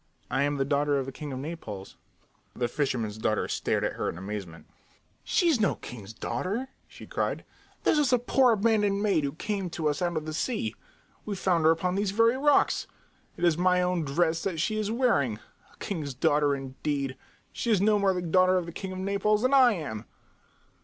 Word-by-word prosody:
"I 135 Hz, -, +1 dB
am 145 Hz, 0 st, +1 dB
the 135 Hz, -, +1 dB
daughter 145 Hz, +1 st, +1 dB
of 135 Hz, -, -1 dB
the 135 Hz, -, -6 dB
king 145 Hz, +2 st, -7 dB
of 130 Hz, -, -4 dB
Naples," 130 Hz, -, -6 dB
she -, -, -17 dB, 0.6 s
said. -, -, -15 dB
The 120 Hz, -, +3 dB
fisherman's 120 Hz, -7 st, -2 dB
daughter 110 Hz, -1 st, 0 dB
stared -, -, -1 dB
at -, -, 0 dB
her -, -, -2 dB
in -, -, -6 dB
amazement. 95 Hz, -3 st, -7 dB, 0.6 s
"She 355 Hz, -, +2 dB
is 310 Hz, -8 st, +3 dB
no 205 Hz, -4 st, +2 dB
king's 110 Hz, -4 st, -9 dB
daughter!" 185 Hz, -, -3 dB, 0.2 s
she -, -, -12 dB
cried. -, -, -2 dB, 0.4 s
"She -, -, +5 dB
is 295 Hz, -4 st, +2 dB
a 250 Hz, -, +5 dB
poor 250 Hz, +1 st, +3 dB
abandoned 205 Hz, -2 st, +2 dB
maid 190 Hz, -8 st, +2 dB
who 140 Hz, -1 st, -2 dB
came 195 Hz, +1 st, -3 dB
to 165 Hz, -2 st, -2 dB
us 145 Hz, -, -2 dB
out 175 Hz, -2 st, 0 dB
of 155 Hz, -, -3 dB
the 155 Hz, -, -5 dB
sea. 155 Hz, -, -2 dB, 0.5 s
We 210 Hz, -, -4 dB
found 175 Hz, -4 st, +1 dB
her 160 Hz, -, +7 dB
upon 180 Hz, +3 st, 0 dB
these 200 Hz, +1 st, 0 dB
very 230 Hz, +4 st, +3 dB
rocks. 290 Hz, +2 st, +3 dB, 0.5 s
It -, -, -6 dB
is 170 Hz, -2 st, +3 dB
my 180 Hz, 0 st, +3 dB
own 180 Hz, -2 st, 0 dB
dress 160 Hz, +3 st, +1 dB
that 180 Hz, -5 st, -2 dB
she 215 Hz, +6 st, 0 dB
is 210 Hz, -1 st, -1 dB
wearing. 220 Hz, -, +1 dB, 0.3 s
A -, -, -23 dB
king's 150 Hz, -9 st, -4 dB
daughter, 145 Hz, +2 st, +2 dB
indeed! 135 Hz, 0 st, -3 dB, 0.4 s
She 235 Hz, -, -3 dB
is 215 Hz, -4 st, +4 dB
no 210 Hz, +1 st, +3 dB
more 200 Hz, -1 st, +3 dB
the 180 Hz, -1 st, -2 dB
daughter 185 Hz, +2 st, +4 dB
of 180 Hz, -, -1 dB
the 170 Hz, -, -7 dB
king 190 Hz, +3 st, -6 dB
of 185 Hz, -, -6 dB
Naples 200 Hz, +3 st, +1 dB
than 255 Hz, +2 st, +2 dB
I 255 Hz, -4 st, +7 dB
am!" 120 Hz, -, -5 dB
175 Hz, 215 wpm, -28 LUFS, 140-205 Hz, 0.6 s, her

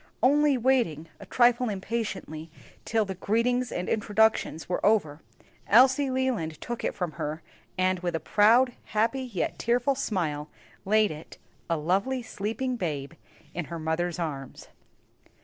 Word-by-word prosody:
Only 290 Hz, +1 st, +4 dB
waiting, 230 Hz, -, +1 dB
a -, -, -11 dB
trifle 245 Hz, 0 st, +3 dB
impatiently, 190 Hz, -6 st, -4 dB, 0.4 s
till 220 Hz, -1 st, +1 dB
the 195 Hz, -, -4 dB
greetings 230 Hz, +6 st, 0 dB
and 180 Hz, -, -3 dB
introductions 215 Hz, -5 st, +1 dB
were 180 Hz, -, -2 dB
over, 160 Hz, -8 st, +2 dB, 0.5 s
Elsie 260 Hz, +5 st, +5 dB
Leland 255 Hz, -, -1 dB
took 240 Hz, -1 st, -5 dB
it -, -, -1 dB
from 180 Hz, -4 st, -2 dB
her, 150 Hz, +2 st, -5 dB, 0.3 s
and 185 Hz, 0 st, +2 dB
with 175 Hz, -1 st, -2 dB
a -, -, 0 dB
proud, 230 Hz, -, +4 dB, 0.2 s
happy, 230 Hz, +5 st, +2 dB
yet 235 Hz, -9 st, -3 dB
tearful 245 Hz, +4 st, +2 dB
smile 165 Hz, -, -2 dB, 0.4 s
laid 215 Hz, 0 st, +3 dB
it 155 Hz, +1 st, -10 dB, 0.3 s
a 165 Hz, -, +1 dB
lovely 195 Hz, +11 st, 0 dB
sleeping 230 Hz, +4 st, -3 dB
babe 150 Hz, -8 st, -3 dB, 0.4 s
in 175 Hz, -1 st, -3 dB
her 170 Hz, +3 st, -6 dB
mother's 165 Hz, +2 st, -1 dB
arms. 145 Hz, -6 st, -5 dB
205 Hz, 140 wpm, -27 LUFS, 165-245 Hz, 0.5 s, Elsie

